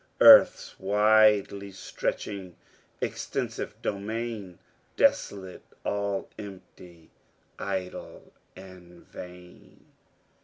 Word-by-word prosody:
Earth's - - +7
widely 105 0 +3
stretching, 95 -1 -5 0.5
extensive - - -4
domain, 105 -2 -4 0.4
Desolate 95 -2 +1 0.2
all 100 -1 -2
empty, 90 -4 -12 0.5
idle, 95 -2 -6 0.2
and 90 -2 -14
vain." 90 0 -13
95 Hz, 65 wpm, -27 LUFS, 90-100 Hz, 0.5 s, Earth's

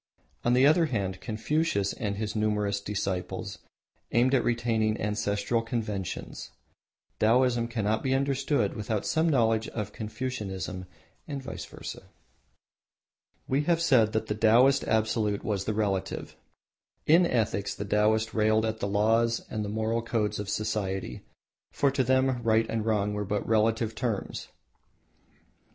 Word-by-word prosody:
On 120 - +3
the 130 +2 +5
other 160 +3 +5
hand, 95 -7 -2
Confucius 110 -2 0
with 105 -4 -3
his 105 +1 -4
numerous 105 -2 0
disciples 95 -3 -3 0.5
aimed 125 +3 +3
at 130 - +3
retaining 115 -2 0
ancestral 105 +2 0
conventions. 110 -5 -4 0.7
Taoism 120 +1 +3
cannot 110 -2 -1
be 130 0 +1
understood 140 +1 0
without 105 -2 -3
some 160 +1 +2
knowledge 115 -5 +2
of 105 -3 -5
Confucianism 105 -5 -5 0.4
and 140 -3 -5
vice - - -6
versa. - - -9 1.4
We 140 +3 +1
have 170 0 +2
said 125 -10 +4
that 110 0 0
the 105 - -2
Taoist 120 +6 +4
Absolute 110 -2 0
was 100 -3 -2
the 110 - -1
Relative. 100 -3 -2 0.7
In 170 +3 +5
ethics 110 - -1
the 100 - -5
Taoist 110 +2 +2
railed 110 0 +2
at 110 0 -2
the 100 - -1
laws 115 +3 +2
and 110 - -2
the 105 - -4
moral 110 +2 -1
codes 110 -3 -1
of 105 -1 -4
society, 95 - -2 0.5
for 140 -1 +2
to 135 -1 +1
them 130 0 +2
right 115 -1 +3
and 115 -1 -2
wrong 105 -2 +1
were 105 0 -2
but 105 0 -2
relative 110 0 +2
terms. 110 -2 -3
110 Hz, 140 wpm, -28 LUFS, 105-120 Hz, 1.4 s, the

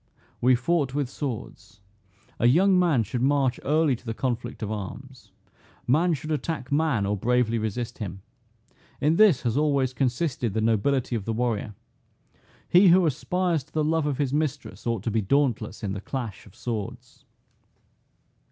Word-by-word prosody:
"We 125 +1 +5
fought 140 +1 0
with 140 -3 -1
swords. 110 -6 -6 0.6
A 120 - +4
young 180 +8 +5
man 160 -10 +3
should 120 +4 -4
march 135 -1 +2
early 150 -1 +2
to 115 - -15
the 115 -2 -4
conflict 120 -2 -3
of 105 - -3
arms. 125 +5 -8 0.5
Man 165 +6 +3
should 155 +3 -6
attack 150 -3 -3
man, 145 -8 +1
or 100 +1 0
bravely 115 +2 +1
resist 115 +3 -4
him. 95 -3 -6 0.8
In 155 +3 +2
this 205 - +5
hath 120 0 0
always 140 -4 +1
consisted 125 - -1
the - - +1
nobility 115 +4 +1
of 105 -4 -3
the 115 - -1
warrior. 110 -3 -2 0.9
He 185 +3 +6
who 180 +1 +6
aspires 165 +2 0
to 150 - -30
the 155 - +1
love 160 0 +1
of 140 -3 -1
his 140 -2 -1
mistress, 150 -4 -3
ought 115 -4 -1
to 115 - -1
be 110 +1 +1
dauntless 125 -2 0
in 100 -2 -2
the 100 - -5
clash 120 -6 -6
of 95 - -18
swords." 120 +1 -6
125 Hz, 165 wpm, -25 LUFS, 115-150 Hz, 0.9 s, He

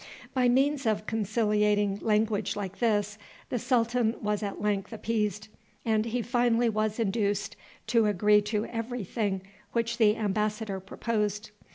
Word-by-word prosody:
By 250 -2 +3
means 270 +1 +2
of 215 -1 0
conciliating 210 -2 +1
language 215 -1 +1
like 195 -2 -5
this 210 -2 +1 0.3
the 245 - -1
sultan 235 -1 +1
was 210 0 -1
at 200 -2 -4
length 205 0 -1
appeased, 215 -2 -2 0.4
and 220 -1 +2
he 235 +1 -1
finally 240 0 +2
was 215 -1 -1
induced 205 -2 0 0.3
to 225 -1 +3
agree 210 +1 +4
to 210 +1 -1
every 235 0 -4
thing 195 -1 -2 0.3
which 235 0 0
the 215 -2 +5
embassador 210 -1 -1
proposed. 210 +1 -2
215 Hz, 140 wpm, -28 LUFS, 210-230 Hz, 0.4 s, the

